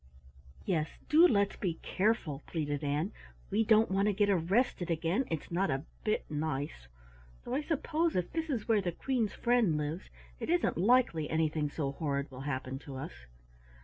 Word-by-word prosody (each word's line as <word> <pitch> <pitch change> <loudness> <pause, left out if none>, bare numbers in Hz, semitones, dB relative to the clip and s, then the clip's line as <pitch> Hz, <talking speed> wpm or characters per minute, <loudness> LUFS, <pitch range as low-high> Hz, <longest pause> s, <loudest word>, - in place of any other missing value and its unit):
"Yes, 160 -5 +1 0.2
do 325 +3 +8
let's 200 - +2
be 175 -5 -1
careful," 185 -8 0
pleaded 145 -3 -2
Ann. 150 +7 0 0.4
"We 215 +3 +3
don't 220 -1 +4
want 195 +2 +2
to 210 - +2
get 205 +1 +3
arrested 185 +1 +1
again, 165 +9 +1
it's 160 -1 -4
not 185 +3 +1
a 135 0 -1 0.2
bit 215 - 0
nice 145 - -3 0.6
though - - -5
I 280 - +1
suppose 320 +2 0
if 180 -1 -1
this 325 -1 -2
is 240 -7 -2
where 220 -3 +4
the 175 -2 -2
Queen's 235 -1 -1
friend 235 -10 +2
lives, 150 +4 -4 0.3
it - - -4
isn't 350 +1 +2
likely 190 -6 +3
anything 155 -2 +1
so 145 -2 -2
horrid 140 -1 -2
will 130 0 -8
happen 130 0 -3
to 140 -1 -9
us." 130 - -5
175 Hz, 175 wpm, -32 LUFS, 150-225 Hz, 0.6 s, do